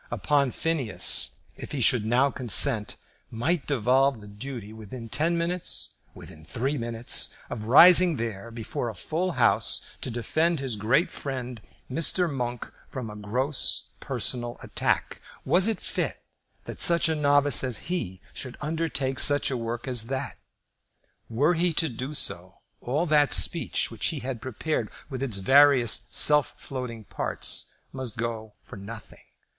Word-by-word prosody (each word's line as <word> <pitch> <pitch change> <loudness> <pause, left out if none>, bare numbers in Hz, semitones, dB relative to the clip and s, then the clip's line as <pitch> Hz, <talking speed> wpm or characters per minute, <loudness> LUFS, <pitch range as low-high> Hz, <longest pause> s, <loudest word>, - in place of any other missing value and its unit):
Upon 145 -2 +1
Phineas, 135 - +1 0.2
if - - -9
he 145 - -2
should 115 -2 +3
now 130 +4 +3
consent, 120 -2 +3 0.3
might 145 +8 -1
devolve 135 0 +2
the 105 - -13
duty, 110 0 -8
within 110 +2 -9
ten 165 +8 0
minutes, 170 +1 -1 0.2
within 80 -1 -12
three 125 - -2
minutes, 115 -2 -1 0.2
of 110 -2 -5
rising 170 +7 +8
there 115 -2 -5
before 115 +1 -5
a 110 - -8
full 170 - -2
House 125 -4 +3 0.2
to - - -3
defend 155 +8 0
his 135 -4 -2
great 115 - +1
friend, 125 -4 -6 0.3
Mr. 165 +6 +2
Monk, 125 -5 -4 0.2
from 120 -5 -6
a - - -10
gross 125 +7 -1
personal 120 -1 -2
attack. - - -1 0.2
Was 185 +3 +4
it 225 - -1
fit - - -3 0.4
that - - -8
such 170 -1 +5
a 160 - +1
novice 145 -3 +3
as 125 -4 -2
he 95 - -3
should 130 -2 -6
undertake 150 -4 -2
such 145 -1 +3
a - - -1
work 115 +1 -5
as 120 -3 0
that? 135 +1 -4 0.9
Were 140 +9 +2
he 170 0 0
to 160 0 0
do 130 +5 -6
so, 90 -5 -1 0.3
all 145 +8 -1
that 150 -3 +3
speech 165 -8 +1
which 115 - -2
he 150 -4 -3
had 125 -3 -5
prepared, 130 +5 -3 0.2
with 130 -1 -5
its 125 -7 -1
various 135 +2 +4
self 150 -1 +3
floating 125 -4 -7
parts, - - -3 0.2
must 130 -5 -5
go 115 -2 -4
for - - -11
nothing. 105 +3 -10
130 Hz, 150 wpm, -26 LUFS, 115-150 Hz, 0.9 s, rising